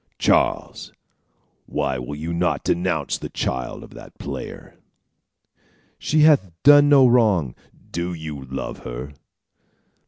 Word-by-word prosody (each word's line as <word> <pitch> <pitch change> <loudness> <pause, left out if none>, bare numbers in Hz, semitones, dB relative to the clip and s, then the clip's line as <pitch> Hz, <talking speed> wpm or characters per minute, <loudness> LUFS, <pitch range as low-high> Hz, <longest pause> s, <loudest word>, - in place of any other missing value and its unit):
Charles, - - 0 0.8
why 65 -1 -2
will 65 +4 -6
you 80 +3 -5
not 85 -5 0
denounce 85 -5 -1
the - - -7
child 65 - -4
of - - -14
that - - -13
player?" - - -8 1.2
"She 155 0 +1
hath 150 -11 +5
done 145 +1 +7
no 140 -2 +7
wrong." 105 - +2 0.4
"Do 85 +1 -3
you 80 -5 -7
love 65 0 -6
her?" 65 +4 -7
85 Hz, 120 wpm, -22 LUFS, -, 1.2 s, done